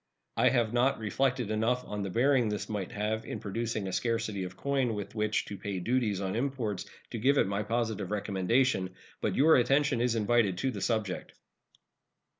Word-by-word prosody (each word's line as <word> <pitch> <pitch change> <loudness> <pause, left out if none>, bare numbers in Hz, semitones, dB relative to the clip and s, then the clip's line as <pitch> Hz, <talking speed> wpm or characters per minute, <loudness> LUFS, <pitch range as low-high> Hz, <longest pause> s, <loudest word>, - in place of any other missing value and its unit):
I - - +4
have 120 -4 +1
not 125 +3 +3
reflected 125 +1 0
enough 115 +4 +1
on 105 0 -4
the 100 - -3
bearing 125 +2 +3
this 105 -1 -3
might 100 -4 -4
have 110 +2 -2
in - - -5
producing 110 0 -3
a 95 - -4
scarcity 115 -4 -1
of 90 +1 -9
coin 135 -1 0
with 105 -1 -6
which 110 -1 0
to 100 - -7
pay 100 -1 -3
duties 110 0 0
on 95 0 -2
imports 120 -6 -2 0.2
to 115 - -4
give 140 +5 +3
it - - +4
my 100 +1 -1
positive 110 -3 -1
recommendation. 100 0 +1 0.3
But - - 0
your 155 +4 +6
attention 135 0 +2
is 120 -1 +2
invited 110 -3 +2
to 130 +7 0
the 100 -5 -6
subject. 110 -5 -2
110 Hz, 185 wpm, -30 LUFS, 100-125 Hz, 0.3 s, your